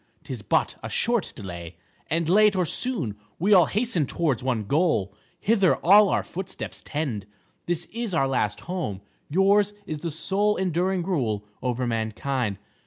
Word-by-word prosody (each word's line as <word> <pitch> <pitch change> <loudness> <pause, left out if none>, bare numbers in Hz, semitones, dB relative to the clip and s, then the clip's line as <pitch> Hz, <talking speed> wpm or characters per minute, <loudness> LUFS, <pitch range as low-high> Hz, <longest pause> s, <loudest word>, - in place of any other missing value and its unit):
'Tis - - -6
but - - +1
a - - -5
short 235 -2 +1
delay, 85 -6 -7 0.3
and 165 +1 0
late 210 +3 +5
or 180 -1 +2
soon 170 - -1 0.2
we 200 +5 +3
all 180 -4 +7
hasten 210 - 0
towards 150 -9 0
one 125 -4 -1
goal. 140 - +1 0.3
Hither 200 -4 +3
all 200 +3 +7
our - - +1
footsteps 190 +1 -6
tend. 130 -10 -3 0.4
This 175 0 -1
is 230 -2 -3
our 135 -4 +3
last 110 -6 -1
home, 165 - -4 0.3
yours 200 +5 +3
is 155 -5 -4
the 170 - -3
sole 200 +6 0
enduring 185 0 0
rule 120 - -1 0.2
over 125 0 -1
mankind. 115 0 -1
165 Hz, 155 wpm, -25 LUFS, 125-195 Hz, 0.4 s, all